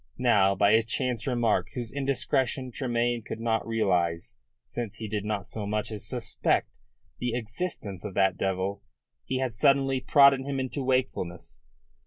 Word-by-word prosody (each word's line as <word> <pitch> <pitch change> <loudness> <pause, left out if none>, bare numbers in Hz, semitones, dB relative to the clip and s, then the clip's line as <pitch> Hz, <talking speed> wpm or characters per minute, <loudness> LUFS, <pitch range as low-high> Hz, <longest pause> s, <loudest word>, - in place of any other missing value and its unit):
Now, 100 -6 +4
by 100 +1 +4
a 110 +1 +6
chance 120 +1 -2
remark 120 -4 +1
whose 120 -3 -4
indiscretion 135 -2 0
Tremayne 120 -1 0
could 110 - -7
not 115 -1 0
realise, 90 - 0 0.3
since 120 -4 -5
he 110 - -5
did 105 -1 -2
not 105 -2 -2
so 105 -2 -5
much 105 +1 -2
as 105 -2 -4
suspect 120 -4 -1 0.4
the 120 -1 -1
existence 110 - -4
of 100 -3 -6
that 95 -2 +3
devil, 95 +1 -2 0.4
he 130 - -1
had 130 -3 -1
suddenly 135 +3 +3
prodded 140 -1 +6
him 135 0 -3
into 130 +2 -3
wakefulness. 130 -9 -2
115 Hz, 155 wpm, -27 LUFS, 100-130 Hz, 0.4 s, a